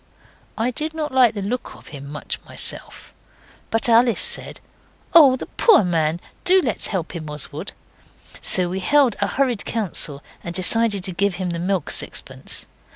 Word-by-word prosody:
I 235 +3 0
did 310 +5 -4
not 305 -1 -3
like 250 -4 +4
the 200 - -4
look 240 +5 -4
of - - -15
him 140 -2 -9
much 150 +1 -6
myself, - - -5 0.6
but 225 +1 0
Alice 235 0 +4
said, - - 0 0.5
'Oh, 285 -6 +8
the - - -6
poor 425 - +4
man, 165 -2 0 0.2
do 375 +1 +5
let's 250 - -1
help 185 -3 -4
him, 155 -2 -6
Oswald.' 150 -1 -4 0.7
So 180 -1 +3
we 185 +2 -3
held 270 +3 +3
a - - +2
hurried 255 -6 -1
council, 165 -9 -2 0.2
and 170 0 -6
decided 205 +1 +3
to 190 - -1
give 200 +1 0
him 180 -1 -3
the 170 - -4
milk 180 -2 -1
sixpence. - - -3
200 Hz, 165 wpm, -21 LUFS, 175-250 Hz, 0.7 s, Oh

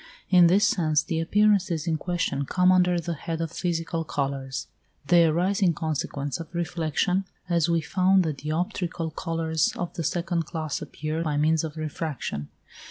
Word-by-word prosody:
In 180 -2 +7
this 195 +4 +4
sense 155 -4 +2
the 165 -4 -2
appearances 190 -2 +2
in 165 -2 0
question 155 -6 -1
come 180 0 +4
under 180 -1 +3
the 170 0 -3
head 165 +1 -4
of 165 -1 -2
physical 165 -1 -2
colours. 135 -2 -3 0.4
They 170 +3 +5
arise 180 +5 +1
in 175 -4 +3
consequence 145 -3 -3
of 165 -1 -8
reflection, 175 +2 0 0.2
as 170 -1 +2
we 170 -1 +2
found 185 +3 +3
the 160 -2 -1
dioptrical 165 +2 -3
colours 160 -1 0
of 175 - -4
the 165 - -4
second 170 0 -1
class 155 -3 -3
appear 155 +2 -4
by 150 -3 -1
means 155 +2 +2
of 160 0 -5
refraction. 150 - -4
165 Hz, 165 wpm, -26 LUFS, 155-175 Hz, 0.4 s, In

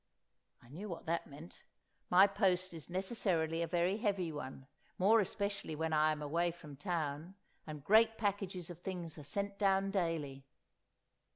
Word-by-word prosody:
I 120 - -18
knew 190 +10 -7
what 170 - -6
that 170 +1 -1
meant. 150 +3 -12 0.5
My 185 +2 +8
post 190 -3 +1
is 160 -1 -8
necessarily 180 -4 0
a 170 - 0
very 175 +4 +1
heavy 200 -7 0
one, 135 -2 -7 0.3
more 215 +5 +5
especially 200 -4 -2
when 160 +1 -1
I 155 0 +4
am 150 -1 -3
away 170 +4 +1
from 155 -4 -10
town, 160 +1 -3 0.3
and 150 -2 -7
great 220 +5 +5
packages 195 -4 -2
of 170 - -10
things 175 -4 -5
are - - -9
sent 200 +7 -1
down 195 -1 +2
daily. 165 -8 -2
175 Hz, 160 wpm, -35 LUFS, 155-195 Hz, 0.5 s, My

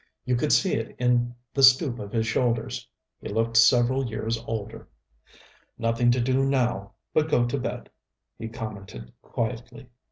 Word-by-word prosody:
You 125 - +1
could 145 +5 0
see 190 - +3
it 115 - -3
in 120 -1 +1 0.2
the 140 - 0
stoop 130 -1 +5
of 100 -4 -7
his 110 -1 0
shoulders. 115 0 -1 0.3
He - - -7
looked 115 +1 -1
several 125 +3 +4
years 115 +1 -2
older. 110 -2 -5 0.9
"Nothing 115 +1 +1
to 120 +1 +3
do 130 +2 +1
now 120 -7 0 0.2
but 155 0 +2
go 120 -5 +3
to 120 +3 -2
bed," - - -5 0.5
he 115 - -5
commented 100 - -8
quietly. 120 +2 -5
120 Hz, 155 wpm, -25 LUFS, 115-130 Hz, 0.9 s, stoop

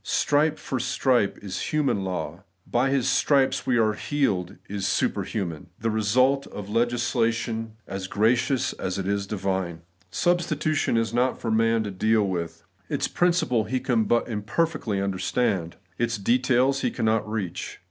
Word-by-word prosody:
Stripe 150 +1 +2
for 130 - -3
stripe 125 -4 +1
is 95 -2 -4
human 145 -10 +1
law; 90 -1 -4
' 90 - -45
by 135 +2 +3
His 135 -2 +1
stripes 140 -2 +2
we 125 - +3
are 110 -2 +3
healed 105 -8 -1
' - - -31
is 95 - -1
superhuman, 90 -5 -1
the 115 +1 0
result 125 +6 +2
of 100 -1 -8
a - - -9
legisla 120 0 +1
tion 115 -1 -4
as 95 -1 -5
gracious 120 +6 +1
as 95 +1 -3
it 95 -1 -3
is 100 0 -1
divine. 95 -4 -2 0.3
Substitution 155 - +1
is 115 -1 0
not 125 +1 +1
for 115 - -2
man 115 0 +3
to 105 - -4
deal 110 +2 +2
with: 85 -3 -4 0.3
its - - 0
principle 170 -11 +1
he 130 +4 -1
but 120 -1 +1
imperfectly 115 +1 -1
understands; 95 -1 -1 0.2
its 120 -1 0
details 125 +5 +2
he - - +1
cannot 110 -1 0
reach. 105 -6 -4
115 Hz, 160 wpm, -25 LUFS, 100-130 Hz, 0.3 s, by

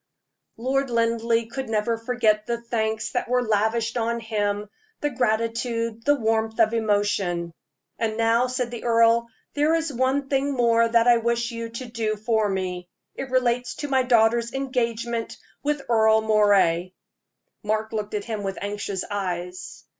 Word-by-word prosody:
Lord 265 +3 0
Linleigh 230 0 +1
could 265 +2 -6
never 220 +1 0
forget 225 -2 0
the 235 -1 -1
thanks 220 -2 -2
that - - -2
were 250 0 +2
lavished 220 +2 +1
on 235 0 0
him 210 -2 -2 0.3
the 295 - -1
gratitude, 230 -1 -1
the 290 - +5
warmth 225 -2 -1
of 225 0 +4
emotion. 205 -6 0 0.5
"And 220 -1 -1
now," 230 +2 +3
said 250 -1 -2
the 235 - -7
earl, 230 0 +4 0.3
"there 300 +3 +2
is 325 -3 -1
one 260 +3 0
thing 275 +1 0
more 230 -2 +3
that 230 0 +3
I 240 -1 +7
wish 235 +1 0
you 230 0 -5
to 235 +3 -7
do 225 -2 -2
for 215 0 0
me. 180 -2 -3 0.2
It 270 - -6
relates 250 -1 +1
to 290 - -5
my 265 -1 +3
daughter's 235 -1 +3
engagement 235 -3 -2 0.2
with 295 -1 -1
Earle 220 -1 +4
Moray." 200 -5 +3 0.7
Mark 215 +1 -1
looked 210 -1 -3
at 205 - -3
him 220 -3 -4
with 195 -1 -4
anxious 205 -2 -4
eyes. 180 -2 -5
230 Hz, 155 wpm, -24 LUFS, 215-240 Hz, 0.7 s, I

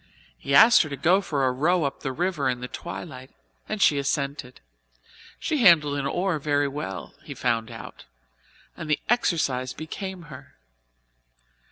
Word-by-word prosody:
He 140 - -2
asked 230 +10 +8
her 155 - -3
to 140 - -5
go 175 +8 +3
for 145 -7 -1
a 130 - +2
row 160 +7 +1
up 140 -1 -3
the 135 - -4
river 150 -1 -1
in 125 -1 -2
the 125 - -6
twilight 125 +7 -8 0.4
and 215 - -3
she 145 -7 +4
assented; 140 -2 -3 0.8
she 310 -3 -1
handled 155 - +5
an 140 - -2
oar 175 0 -1
very 145 0 +1
well, 135 -9 -6
he - - -8
found 115 -2 -1
out, - - -10 0.7
and 160 - -8
the 150 - +2
exercise 140 - 0
became 185 +3 -7
her. 135 -4 -13
145 Hz, 160 wpm, -25 LUFS, 130-175 Hz, 0.8 s, asked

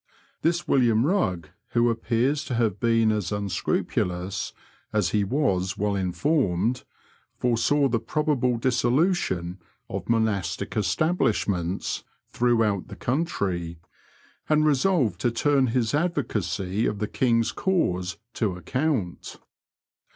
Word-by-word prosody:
This 170 +1 0
William 120 -4 +3
Bugg, 95 - 0 0.2
who 120 0 +3
appears 120 +6 0
to 125 - -3
have 110 -4 0
been 115 -1 +3
as 105 -5 -2
unscrupulous 95 -2 -2 0.4
as 105 -5 +1
he 105 +3 +1
was 100 -5 0
well 105 0 0
informed, 100 - 0 0.5
foresaw 125 +4 +2
the 115 -3 0
probable 125 -1 0
dissolution 120 - +1 0.3
of - - -5
monastic 100 -6 0
establishments 100 - 0 0.3
throughout 115 -5 +1
the - - -9
country, 95 - -2 0.7
and 155 0 +4
resolved 140 - +2
to 120 - +2
turn 135 +3 +2
his 115 -2 0
advocacy 105 - -1
of 105 - -2
the 105 +1 -2
King's 115 -2 +1
cause 90 - 0 0.2
to 105 -6 -1
account. 125 - -2
115 Hz, 110 wpm, -25 LUFS, 95-135 Hz, 0.7 s, and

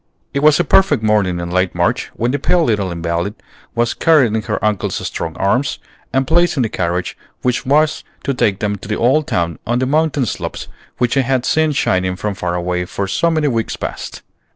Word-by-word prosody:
It 140 - 0
was 150 0 +5
a - - +4
perfect 195 - +3
morning 100 -5 +2
in 85 0 -4
late 95 0 +1
March 85 0 0
when 120 +2 0
the 145 - -1
pale 175 +4 +2
little 105 -8 0
invalid 85 +4 -2 0.4
was 120 0 +1
carried 150 -9 +4
in 110 - 0
her - - -2
uncle's 105 -3 0
strong 80 0 -4
arms, 120 +10 +1 0.3
and 135 0 +1
placed 170 +2 +2
in 130 - +3
the 110 - -1
carriage 90 -1 -2 0.3
which 125 0 0
was 150 +3 +2 0.2
to 140 - 0
take 100 -6 0
them 105 -1 -1
to 95 - -11
the 105 - -1
old 135 +6 +2
town 85 -1 -1
on 120 +1 +1
the 130 - +1
mountain 150 -1 +1
slopes 105 - -5 0.3
which 125 -1 +1
they 135 - +3
had 130 -1 0
seen 155 -1 +2
shining 95 -9 +1
from 105 +2 -3
far 90 -2 -3
away 90 0 -1
for 100 +2 -3
so 170 - +1
many 155 -2 +1
weeks 115 -5 -1
past. - - -6
115 Hz, 210 wpm, -17 LUFS, 95-140 Hz, 0.4 s, was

